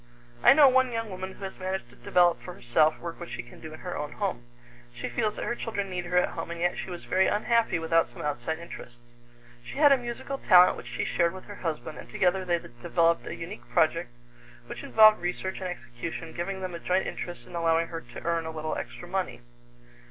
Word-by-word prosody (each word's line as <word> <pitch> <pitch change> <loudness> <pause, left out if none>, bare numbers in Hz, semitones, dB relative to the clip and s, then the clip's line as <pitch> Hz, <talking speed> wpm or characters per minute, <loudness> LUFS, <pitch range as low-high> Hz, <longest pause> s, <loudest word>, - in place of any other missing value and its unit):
I 245 - +9
know 290 -1 +8
one 260 -1 +4
young 225 -2 -3
woman 190 0 -5
who 200 - -12
has 190 - -6
managed 185 -9 -3
to - - -17
develop 175 +7 +3
for 180 - -8
herself 155 +6 +2
work 170 -1 -6
which - - -7
she 120 - -4
can 120 - -15
do 160 - -8
in 155 - -10
her 180 -1 -4
own 150 0 -4
home. 185 -13 -3 0.5
She - - -4
feels 210 - -1
that - - -4
her - - 0
children 205 -5 -3
need 180 -1 -3
her 180 +1 0
at 180 - +4
home, - - -5
and 170 0 -5
yet 175 +1 +1
she - - -5
was 175 -1 -7
very 190 +1 +3
unhappy 225 -3 +2
without 165 0 +2
some - - -9
outside 150 +1 -2
interests. 120 -7 -11 0.5
She - - -9
had 290 -1 +7
a 275 - +7
musical 245 +3 -5
talent 180 -2 +7
which 120 - -9
she 120 - -2
shared 170 0 +1
with 185 - -9
her 205 - -10
husband, 160 -2 -4
and - - -11
together 190 +1 +1
they 175 -1 +1
developed 165 +5 0
a - - -4
unique 180 +6 -8
project 165 -1 +2 0.6
which - - -7
involved 215 -1 +6
research 180 +2 -3
and 185 - -3
execution, 160 +1 -6
giving 190 +2 -4
them 185 -1 -4
a 170 - -5
joint 185 +2 +1
interest 175 -9 -6
and 145 - -11
allowing 165 0 +2
her 165 -1 -5
to 120 -3 -11
earn 165 -1 0
a - - -3
little 155 0 -3
extra 175 - -7
money. 185 -7 -2
175 Hz, 230 wpm, -28 LUFS, 160-190 Hz, 0.6 s, I